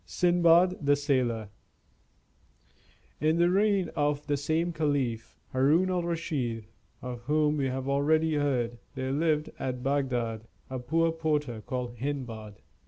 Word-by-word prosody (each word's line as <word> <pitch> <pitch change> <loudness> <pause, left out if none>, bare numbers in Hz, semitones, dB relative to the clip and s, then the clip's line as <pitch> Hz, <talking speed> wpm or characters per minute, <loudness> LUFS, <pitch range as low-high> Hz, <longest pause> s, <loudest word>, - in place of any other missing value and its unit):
SINDBAD 175 0 +3
THE 145 0 +4
SAILOR 125 -7 0 1.7
In 155 +2 +2
the 175 +1 +4
reign 200 -2 +2
of 145 -1 0
the 145 - 0
same 160 +4 0
caliph, 140 -8 -1 0.2
Haroun 155 +8 +3
al 180 -1 +1
Raschid, 150 -10 -2 0.4
of 125 -2 -5
whom 150 +1 +2
we 140 - 0
have 130 +1 -3
already 155 +3 +2
heard, 125 -5 0 0.2
there 130 0 -2
lived 155 +1 +1
at 125 -2 -3
Bagdad 125 -5 -1 0.2
a 130 - -3
poor 165 +6 +1
porter 150 -8 -1
called 125 +1 -4
Hindbad. 115 -6 -5
145 Hz, 130 wpm, -28 LUFS, 125-160 Hz, 1.7 s, THE